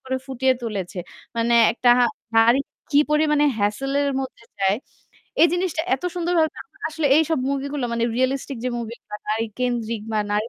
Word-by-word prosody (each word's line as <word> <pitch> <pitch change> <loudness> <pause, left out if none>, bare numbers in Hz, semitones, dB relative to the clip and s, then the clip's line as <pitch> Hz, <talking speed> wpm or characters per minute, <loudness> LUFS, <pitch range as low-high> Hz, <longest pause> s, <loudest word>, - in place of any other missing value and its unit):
করে 260 0 -1
ফুটিয়ে 265 0 +2
তুলেছে। 195 -5 -4 0.4
মানে 230 +1 +2 0.2
একটা 245 +1 +3 0.5
নারী 230 +3 +6 0.3
কি 285 - +5
পরিমাণে 300 -1 +3
hassle 215 +7 -1
এর 285 - +1
মধ্যে 260 -3 -7
যায়, 195 0 +2 0.7
এই 335 - +8
জিনিসটা 355 -2 0
এত 265 - -17
সুন্দরভাবে, 340 -3 +1
আমার 275 - -29
আসলে 315 -1 0
এইসব 320 0 +2
movie-গুলো 280 -1 -2
মানে 230 0 0
realistic 265 +1 -1
যে - - +1
movie 235 0 -6
গুলা 210 - -8
নারী 220 +1 0
কেন্দ্রিক 235 -3 -1
বা 215 - +2
নারী 210 +2 0
260 Hz, 165 wpm, -23 LUFS, 230-290 Hz, 0.7 s, এই